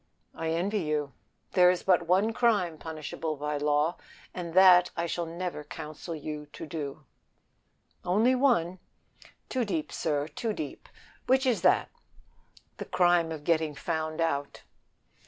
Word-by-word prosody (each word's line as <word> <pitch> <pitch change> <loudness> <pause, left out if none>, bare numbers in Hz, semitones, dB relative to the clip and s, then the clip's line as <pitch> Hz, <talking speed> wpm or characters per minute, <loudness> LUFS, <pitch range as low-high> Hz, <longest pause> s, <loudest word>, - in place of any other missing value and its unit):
"I 165 0 -3
envy 185 +6 0
you. 150 -5 -2 0.4
There 180 -1 +6
is 180 -1 0
but 175 -3 +3
one 195 +6 +3
crime 205 -10 +1
punishable 155 0 -5
by 150 +1 -3
law, 150 +3 +1 0.4
and 170 -2 -6
that 180 -1 +7
I 170 - 0
shall 170 0 -3
never 170 -2 -5
counsel 155 +2 -7
you 150 -1 -6
to." 155 -3 -6 1.0
"Only 215 +8 +3
one 230 -10 +2 0.7
too 255 -2 -1
deep, 170 -8 -3
sir, 145 -2 -1
too 220 +6 -3
deep. 155 -7 -7 0.4
Which 265 +1 +3
is 250 -4 +1
that?" - - +3 0.9
"The - - -6
crime 175 -2 +3
of 155 -2 -6
getting 160 -2 +1
found 155 0 -3
out." 145 -4 -2
165 Hz, 135 wpm, -28 LUFS, 155-185 Hz, 1.0 s, that